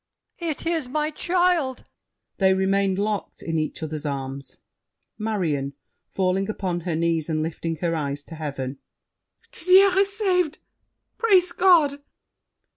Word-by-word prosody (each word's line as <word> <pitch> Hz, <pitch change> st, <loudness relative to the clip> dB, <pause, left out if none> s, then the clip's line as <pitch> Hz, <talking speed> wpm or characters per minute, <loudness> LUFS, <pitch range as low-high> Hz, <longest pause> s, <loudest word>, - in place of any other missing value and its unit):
It 330 Hz, -3 st, -3 dB
is 325 Hz, -5 st, 0 dB
my 305 Hz, +2 st, -1 dB
child! 350 Hz, -5 st, +1 dB, 0.5 s
[They 190 Hz, -1 st, +4 dB
remain 195 Hz, 0 st, +1 dB
locked 205 Hz, +1 st, -3 dB
in 165 Hz, -1 st, -1 dB
each 155 Hz, +1 st, -3 dB
other's 155 Hz, -1 st, -4 dB
arms. 140 Hz, -1 st, -5 dB, 0.6 s
MARION 165 Hz, -11 st, -1 dB, 0.4 s
(falling 190 Hz, +1 st, 0 dB
upon 185 Hz, -4 st, -2 dB
her 170 Hz, -1 st, -3 dB
knees 165 Hz, -1 st, 0 dB
and 155 Hz, -1 st, 0 dB
lifting 165 Hz, 0 st, -3 dB
her 170 Hz, -1 st, 0 dB
eyes 145 Hz, -2 st, -3 dB
to 165 Hz, -, -12 dB
heaven). 140 Hz, -3 st, -5 dB, 0.7 s
Didier 370 Hz, +2 st, +5 dB
is 395 Hz, 0 st, +3 dB
saved! 360 Hz, -7 st, +1 dB, 0.6 s
Praise 375 Hz, -6 st, +4 dB
God! 335 Hz, -6 st, +4 dB
195 Hz, 125 wpm, -24 LUFS, -, 0.7 s, Didier